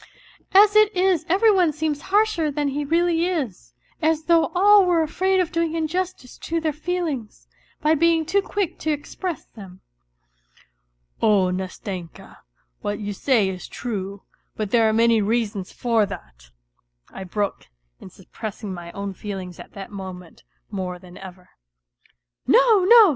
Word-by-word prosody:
As 410 Hz, +2 st, +6 dB
it 430 Hz, 0 st, +6 dB
is 360 Hz, -3 st, +2 dB
every 415 Hz, +5 st, +5 dB
one 365 Hz, -5 st, +3 dB
seems 305 Hz, -1 st, -2 dB
harsher 405 Hz, -6 st, +2 dB
than 290 Hz, 0 st, -1 dB
he 290 Hz, +2 st, -2 dB
really 335 Hz, +2 st, +1 dB
is, 250 Hz, -, -4 dB, 0.3 s
as 315 Hz, 0 st, +1 dB
though 330 Hz, -1 st, +3 dB
all 405 Hz, +2 st, +6 dB
were 345 Hz, -3 st, +2 dB
afraid 375 Hz, +5 st, +1 dB
of 360 Hz, -3 st, 0 dB
doing 335 Hz, -1 st, -1 dB
injustice 330 Hz, -4 st, -3 dB
to 330 Hz, +1 st, -2 dB
their 315 Hz, -2 st, -1 dB
feelings, 310 Hz, -8 st, -4 dB, 0.4 s
by 305 Hz, +1 st, +4 dB
being 325 Hz, +1 st, +3 dB
too 400 Hz, +6 st, +2 dB
quick 390 Hz, -3 st, -3 dB
to 315 Hz, -, -3 dB
express 310 Hz, +4 st, -4 dB
them." 190 Hz, -4 st, -13 dB, 0.7 s
" -, -, -35 dB
Oh, 195 Hz, -4 st, +3 dB
Nastenka, 185 Hz, -2 st, -7 dB, 0.4 s
what 205 Hz, -, -2 dB
you 205 Hz, -1 st, -4 dB
say 225 Hz, -1 st, +2 dB
is 185 Hz, -1 st, -5 dB
true; 200 Hz, -4 st, -5 dB, 0.3 s
but 210 Hz, -2 st, -4 dB
there 230 Hz, -2 st, +4 dB
are -, -, +1 dB
many 230 Hz, 0 st, +4 dB
reasons 205 Hz, -3 st, -1 dB
for 230 Hz, -4 st, +1 dB
that," -, -, -11 dB, 0.6 s
I 190 Hz, -, -7 dB
broke 200 Hz, -, -3 dB, 0.3 s
in -, -, -11 dB
suppressing 205 Hz, +2 st, -8 dB
my 170 Hz, -1 st, -8 dB
own 200 Hz, 0 st, -5 dB
feelings 190 Hz, -3 st, -7 dB
at -, -, -12 dB
that 195 Hz, 0 st, -9 dB
moment 185 Hz, -3 st, -9 dB, 0.3 s
more 180 Hz, -1 st, -4 dB
than 180 Hz, 0 st, -15 dB
ever. 185 Hz, -1 st, -12 dB, 0.5 s
" -, -, -38 dB
No, 425 Hz, -6 st, +5 dB
no! 450 Hz, -1 st, +8 dB
250 Hz, 155 wpm, -23 LUFS, -, 0.7 s, no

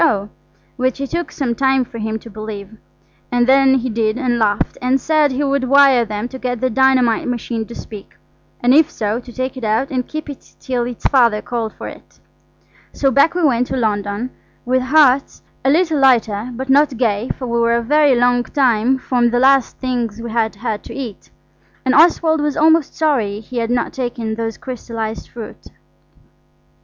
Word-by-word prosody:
O., 210 Hz, -10 st, +1 dB, 0.5 s
which 255 Hz, +1 st, -1 dB
it 275 Hz, -1 st, -4 dB
took 345 Hz, 0 st, -3 dB
some 260 Hz, -5 st, -2 dB
time 265 Hz, +1 st, +1 dB
for 230 Hz, -1 st, -9 dB
him 220 Hz, 0 st, -2 dB
to 220 Hz, -, -13 dB
believe, 215 Hz, -1 st, -8 dB, 0.6 s
and 245 Hz, 0 st, +2 dB
then 265 Hz, +1 st, +5 dB
he 255 Hz, -1 st, -1 dB
did 220 Hz, 0 st, 0 dB
and 250 Hz, -3 st, 0 dB
laughed, 205 Hz, -2 st, 0 dB
and 255 Hz, +2 st, +1 dB
said 305 Hz, 0 st, +2 dB
he 265 Hz, +3 st, -1 dB
would 275 Hz, -1 st, 0 dB
wire 275 Hz, -2 st, +5 dB
them 210 Hz, +1 st, -4 dB
to 260 Hz, -, -9 dB
get 245 Hz, -2 st, -3 dB
the 255 Hz, +1 st, 0 dB
dynamite 255 Hz, -2 st, +2 dB
machine 235 Hz, -2 st, -3 dB
to 235 Hz, -, -10 dB
speak, 210 Hz, -3 st, -10 dB, 0.5 s
and 245 Hz, +1 st, +4 dB
if 310 Hz, +2 st, +5 dB
so, 215 Hz, -3 st, -2 dB
to 245 Hz, 0 st, -12 dB
take 255 Hz, +2 st, -4 dB
it 260 Hz, -, -8 dB
out 225 Hz, +7 st, 0 dB
and 255 Hz, -2 st, -2 dB
keep 310 Hz, 0 st, -6 dB
it 285 Hz, -2 st, -11 dB
till 245 Hz, -2 st, -2 dB
its 245 Hz, -2 st, -9 dB
Father 235 Hz, -5 st, +3 dB
called 230 Hz, -1 st, -4 dB
for -, -, -8 dB
it. -, -, -13 dB, 0.7 s
So 270 Hz, -1 st, 0 dB
back 280 Hz, +6 st, +3 dB
we 355 Hz, -, 0 dB
went 250 Hz, -4 st, +2 dB
to 265 Hz, -, -3 dB
London, 210 Hz, +1 st, -2 dB, 0.3 s
with 255 Hz, +1 st, +1 dB
hearts 275 Hz, 0 st, +3 dB, 0.2 s
a 270 Hz, -, +2 dB
little 320 Hz, 0 st, +2 dB
lighter, 235 Hz, -4 st, +2 dB
but 260 Hz, +3 st, -6 dB
not 275 Hz, -1 st, +3 dB
gay, 225 Hz, -1 st, 0 dB
for 260 Hz, -, -5 dB
we 235 Hz, -1 st, -1 dB
were 235 Hz, 0 st, +2 dB
a 235 Hz, -, 0 dB
very 290 Hz, +1 st, +3 dB
long 245 Hz, 0 st, +2 dB
time 250 Hz, -2 st, +1 dB
from 245 Hz, -2 st, +1 dB
the 245 Hz, -, 0 dB
last 270 Hz, -1 st, +3 dB
things 240 Hz, -4 st, -3 dB
we 230 Hz, 0 st, -6 dB
had 220 Hz, -1 st, 0 dB
had 220 Hz, -3 st, -4 dB
to -, -, -9 dB
eat. 250 Hz, -7 st, -7 dB, 0.6 s
And 260 Hz, -, +2 dB
Oswald 320 Hz, -1 st, +4 dB
was 295 Hz, -1 st, -1 dB
almost 320 Hz, -1 st, +3 dB
sorry 240 Hz, -10 st, 0 dB
he 240 Hz, +3 st, -9 dB
had 230 Hz, -1 st, -1 dB
not 245 Hz, -1 st, -1 dB
taken 240 Hz, -3 st, -3 dB
those 225 Hz, 0 st, -4 dB
crystallised 230 Hz, -3 st, -6 dB
fruits. 230 Hz, -3 st, -10 dB
250 Hz, 195 wpm, -18 LUFS, 225-270 Hz, 0.7 s, then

